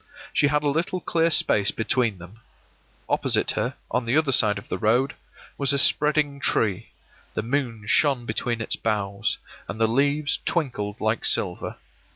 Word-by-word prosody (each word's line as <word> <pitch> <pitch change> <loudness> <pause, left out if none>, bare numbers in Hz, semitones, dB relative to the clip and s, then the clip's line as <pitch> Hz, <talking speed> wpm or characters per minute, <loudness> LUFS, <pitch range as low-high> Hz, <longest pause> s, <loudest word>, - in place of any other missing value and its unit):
She 145 - +3
had 150 +1 0
a - - 0
little 165 +5 -1
clear 165 -1 +1
space 105 -9 +3
between 115 -2 0
them. 90 +5 -14 0.7
Opposite - - +1
her, - - -2 0.2
on 125 -1 -1
the 120 +6 +1
other 155 -3 +2
side 105 -5 +5
of 100 - -10
the - - -4
road, 120 +5 +1 0.5
was 140 -1 +6
a - - +2
spreading 150 0 +2
tree; 105 -8 +1 0.5
the - - -2
moon 120 -3 -3
shone 125 +3 +2
between 115 +1 -2
its - - -1
boughs, 100 -3 -2 0.3
and 110 - -7
the 115 - +4
leaves 140 +4 +1
twinkled 115 -11 -2
like 110 +1 -1
silver. 90 -3 0
120 Hz, 165 wpm, -24 LUFS, 110-145 Hz, 0.7 s, was